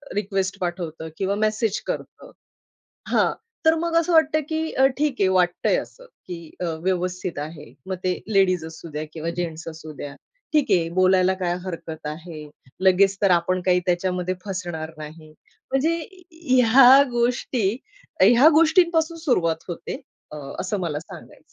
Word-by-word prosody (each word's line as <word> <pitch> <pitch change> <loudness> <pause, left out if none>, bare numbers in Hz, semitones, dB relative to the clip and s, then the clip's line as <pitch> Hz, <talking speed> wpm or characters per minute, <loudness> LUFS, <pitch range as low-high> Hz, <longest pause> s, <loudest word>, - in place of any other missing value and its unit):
Request 195 -1 -2
पाठवतं 170 -3 -4
किंवा 195 +1 -1
message 215 -1 0
करतं. - - -6 0.8
हां. - - +3 0.3
तर 320 - +5
मग 330 +1 -2
असं 335 +1 +1
वाटतं 310 -1 +4
की 320 0 -2
अ, 265 - +4
ठीक 295 -2 0
आहे 190 - +4
वाटतंय 180 -1 +2
असं, - - -8 0.2
की 170 -3 -8
अ, 180 - 0 0.2
व्यवस्थित 180 -2 -2
आहे. 150 0 -8
मग 190 - -2
ते 185 -1 0
लेडीज 185 -5 +2
असूद्या 160 -1 -7
किंवा 165 +1 -4
जेन्ट्स 165 -2 -4
असूद्या. 155 -3 -9 0.4
ठीक 300 -2 +4
आहे 170 -3 +3
बोलायला 185 0 +4
काय 175 -1 0
हरकत 165 -4 -7
आहे, 155 -1 -8 0.3
लगेच 195 +1 +4
तर 200 - +4
आपण 180 +1 +2
काही 180 -1 +4
त्याच्यामध्ये 180 +1 0
फसणार 175 -4 -5
नाही. 155 +1 -10 0.4
म्हणजे 315 +5 +1 0.3
ह्या 260 -3 +6
गोष्टी 240 -2 0 0.5
ह्या 240 +10 +7
गोष्टींपासून 330 +1 +3
सुरुवात 175 - 0
होते. 215 - -6 0.3
अ, 150 - -7 0.2
असं 195 +2 -2
मला 150 -4 -2
सांगायचंय. - - -13
185 Hz, 140 wpm, -23 LUFS, 170-255 Hz, 0.8 s, ह्या